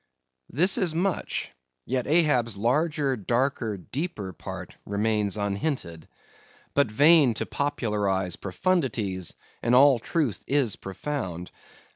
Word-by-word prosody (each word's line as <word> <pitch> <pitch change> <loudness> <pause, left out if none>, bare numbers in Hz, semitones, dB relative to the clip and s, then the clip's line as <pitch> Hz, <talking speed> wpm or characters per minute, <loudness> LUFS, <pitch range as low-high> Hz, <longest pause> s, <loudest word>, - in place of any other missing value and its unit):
This 180 +9 +3
is 170 -4 +1
much; 180 +2 -1 0.3
yet 125 -1 -1
Ahab's 140 -9 +2
larger, 140 +5 +1
darker, 120 -1 -1
deeper 105 - -5
part - - -8
remains 105 0 0
unhinted. 100 - -3 0.7
But 140 -2 +3
vain 145 +1 +5
to - - -2
popularize 105 -10 -1
profundities, 100 - -1 0.3
and 120 +1 +2
all 135 -1 +6
truth 145 - -2
is 135 -7 +2
profound. 95 - -5
120 Hz, 105 wpm, -26 LUFS, 100-145 Hz, 0.7 s, all